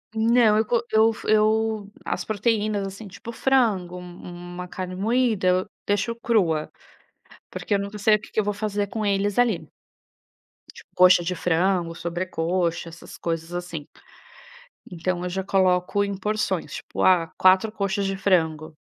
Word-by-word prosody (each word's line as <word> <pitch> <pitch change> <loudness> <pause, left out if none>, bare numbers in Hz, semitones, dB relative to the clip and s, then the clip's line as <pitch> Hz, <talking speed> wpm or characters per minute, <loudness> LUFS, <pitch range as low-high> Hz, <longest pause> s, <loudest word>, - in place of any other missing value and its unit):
Não. 225 -1 +4
Eu 220 - +2
co 235 +1 +1
eu 220 +1 +4
fo - - -10
eu 215 0 +2 0.2
as - - -3
proteínas, 215 -1 0
assim, 200 +2 -9
tipo 220 +4 -9
frango, 220 -9 +1
um 175 0 -10
uma 180 0 -6
carne 185 0 -6
moída 220 0 +1
eu 185 +1 +2 0.2
deixo 205 +3 0
crua. 205 - 0 0.8
Porque - - -3
eu - - +1
nunca 200 +1 -5
sei 215 +1 +5
o - - -2
que - - -14
que - - -1
eu - - +2
vou 205 0 -1
fazer 205 -1 -2
com 215 +2 -3
eles 200 0 0
ali. 220 -11 +2 1.3
Coxa 180 -1 +6
de 180 +2 -2
frango, 175 0 +1
sobrecoxa, 170 0 -2
essas 165 +1 -12
coisas 165 0 -4
assim. 175 -4 -5 1.0
Então 180 0 -3
eu 180 - -2
já 190 +2 -3
coloco 185 0 +2
em 200 0 -3
porções. 195 -6 -2
Tipo, - - -4
ah, 180 -3 +4
4 190 +4 +4
coxas 200 -1 -1
de 195 0 -1
frango. 160 -5 0
195 Hz, 160 wpm, -24 LUFS, 180-215 Hz, 1.3 s, Coxa